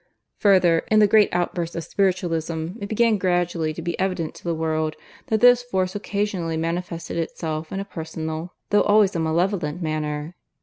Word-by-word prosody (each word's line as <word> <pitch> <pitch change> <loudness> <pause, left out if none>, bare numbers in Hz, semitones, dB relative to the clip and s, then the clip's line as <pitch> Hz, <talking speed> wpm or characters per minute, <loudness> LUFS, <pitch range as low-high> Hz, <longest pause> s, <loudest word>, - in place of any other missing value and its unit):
Further, 185 -5 +5
in 215 - +4
the 215 - +7
great 210 0 +5
outburst 175 -1 -2
of 170 - -3
Spiritualism 165 -4 -1
it 200 -1 -6
began 225 -1 +2
gradually 175 -3 0
to 160 +2 -7
be 170 0 -3
evident 185 -4 -1
to - - -15
the 170 -1 -1
world 155 -1 -1 0.3
that 220 -1 0
this 245 0 +7
force 190 -7 -1
occasionally 200 -5 -2
manifested 170 +1 -3
itself 160 -1 -3
in 195 - -3
a 195 - -4
personal, 160 -1 -6 0.2
though 205 - +5
always 205 -2 +4
a - - 0
malevolent 165 0 0
manner. 155 -1 -3
175 Hz, 170 wpm, -23 LUFS, 160-195 Hz, 0.3 s, the